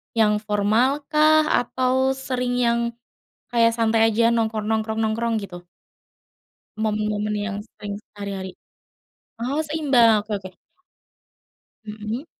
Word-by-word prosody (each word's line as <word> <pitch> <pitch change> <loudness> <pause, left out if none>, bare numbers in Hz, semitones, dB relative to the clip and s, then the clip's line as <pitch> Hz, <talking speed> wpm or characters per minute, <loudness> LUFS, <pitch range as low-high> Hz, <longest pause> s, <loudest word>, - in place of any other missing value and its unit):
Yang 210 -1 +2
formal 220 +7 +1
kah 310 0 +4
atau 260 +1 +1
sering 250 -2 -2
yang 235 -1 +2 0.7
kayak 230 -1 +4
santai 225 0 +3
aja, 230 +2 +3
nongkrong 220 -2 -1
nongkrong 220 0 -1
nongkrong, 225 +1 0
gitu? 180 -4 -7 1.1
Momen-momen 210 -1 -1
yang 205 0 -3
sering 205 -2 -8 0.2
sehari-hari? 195 -2 -6 0.9
Oh 265 +6 -2
seimbang, 270 -8 +3
oke 215 - -11
oke. 185 -1 -11 1.3
Mhm. 215 +5 -5
225 Hz, 105 wpm, -23 LUFS, 210-250 Hz, 1.3 s, kah